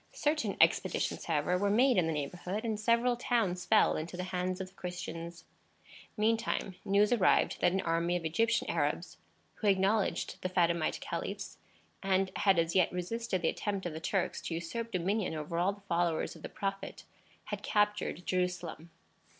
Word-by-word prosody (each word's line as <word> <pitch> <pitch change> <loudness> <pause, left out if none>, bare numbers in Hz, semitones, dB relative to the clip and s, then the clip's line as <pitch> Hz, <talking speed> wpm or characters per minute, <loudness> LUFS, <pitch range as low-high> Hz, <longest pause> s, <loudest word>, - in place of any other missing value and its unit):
Certain 300 0 0
expeditions, - - +2
however, 165 +3 +1
were 200 +1 +2
made 250 +5 +4
in 180 -4 +3
the - - 0
neighborhood, 180 - -3
and 220 -2 -1
several 235 +3 +3
towns 225 -7 0
fell 220 - +5
into 165 +3 -5
the 180 - -2
hands 180 +1 -1
of 190 -1 -5
the - - -26
Christians. 170 -2 -6 0.7
Meantime, 220 -2 0
news 205 +3 +3
arrived 195 -7 +3
that 175 - +4
an 190 +1 0
army 170 0 0
of 170 - -7
Egyptian 225 +9 +1
Arabs 160 +2 -1 0.4
who 215 - -1
acknowledged 195 +2 +1
the 185 - -2
Fatimite 170 -3 +1
caliphs, - - -5 0.4
and 190 0 +1
had 195 -3 +4
as 165 0 +1
yet 185 -2 +4
resisted 185 +1 -2
the 160 - +3
attempt 200 -3 -3
of 175 - -3
the 160 - -5
Turks 190 +3 -1
to 165 - -4
usurp 230 +8 -4
dominion 185 -1 0
over 155 +2 -3
all 180 +3 +3
the 205 - -16
followers 170 -4 0
of 165 - -13
the - - -6
Prophet 195 0 -4 0.4
had 205 -1 -5
captured 210 -4 0
Jerusalem. 180 -3 -2
185 Hz, 170 wpm, -32 LUFS, 170-210 Hz, 0.7 s, fell